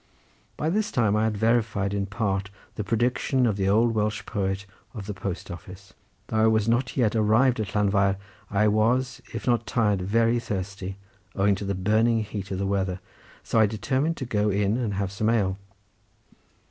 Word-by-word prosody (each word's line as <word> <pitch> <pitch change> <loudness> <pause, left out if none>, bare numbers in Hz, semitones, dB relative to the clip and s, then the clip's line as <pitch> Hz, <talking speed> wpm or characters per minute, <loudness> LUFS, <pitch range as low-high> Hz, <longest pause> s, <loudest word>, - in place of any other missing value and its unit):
By 155 - 0
this 210 +2 0
time 110 -5 +2
I 110 +1 +2
had 110 -2 -1
verified 110 -3 +1
in 100 -1 -1
part 100 -1 -1 0.2
the 105 - -4
prediction 120 +4 +1
of 110 -4 +1
the 95 -1 0
old 115 +3 +3
Welsh 105 0 -1
poet 95 -1 -2 0.3
of 105 -4 -6
the 105 - -4
post 95 -1 -5
office. 95 +3 -11 0.3
Though 110 - -3
I 110 0 +5
was 110 -1 +2
not 120 +4 0
arrived 115 +2 +3
at 100 -2 -4
Llanfair 100 -1 +2 0.3
I 105 +1 +2
was, 120 +5 +1
if - - -5
not 120 -2 +1
tired, 105 -5 +1
very 115 +5 +2
thirsty, 95 -3 -5 0.4
owing 100 +1 +3
to 100 +1 -4
the 100 0 -1
burning 110 +4 +2
heat 100 -2 -6
of 95 - -3
the 100 - -1
weather, 95 -2 -1 0.4
so 115 - +1
I 110 - +6
determined 130 +10 -1
to 130 - -4
go 105 -3 +1
in 100 +1 +1
and 115 -5 -1
have 100 -1 -2
some 110 +2 0
ale. 100 -4 +1
105 Hz, 185 wpm, -26 LUFS, 100-115 Hz, 0.4 s, I